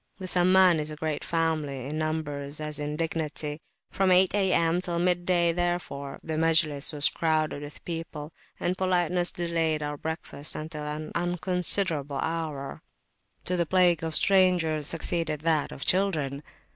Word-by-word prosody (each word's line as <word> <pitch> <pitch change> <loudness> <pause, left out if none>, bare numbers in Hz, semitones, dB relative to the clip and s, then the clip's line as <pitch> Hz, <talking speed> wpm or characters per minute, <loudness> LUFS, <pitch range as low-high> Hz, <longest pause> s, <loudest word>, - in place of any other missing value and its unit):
The 190 - -7
Samman 185 -1 +5
is 150 0 -3
a 155 - -6
great 155 -1 -3
family, 155 -5 -1
in 150 +3 -4
numbers 150 -2 -3
as 150 0 -5
in 150 0 -3
dignity; 155 -1 -3 0.3
from 190 -1 +2
8 185 0 +5
A.M. 180 -4 +2
till 175 -2 -2
mid 175 0 +1
day 175 -2 +3
therefore 175 -5 -3
the 160 -1 -3
Majlis 155 -3 +2
was 150 -1 +4
crowded 155 -3 0
with 145 0 -10
people, 165 -2 -6 0.3
and 180 - 0
politeness 180 -1 +1
delayed 165 -3 -1
our 145 0 -4
breakfasts 155 -2 -3
until 155 -1 -5
an 155 +1 -5
unconscionable 175 -4 0
hour. 155 -3 -4 0.6
To 180 - -1
the 170 -2 0
plague 175 -3 +3
of 160 -1 +2
strangers 175 -6 +3
succeeded 165 -2 -1
that 155 -2 +1
of 140 - -7
children. 155 -8 0
160 Hz, 150 wpm, -27 LUFS, 150-175 Hz, 0.6 s, Samman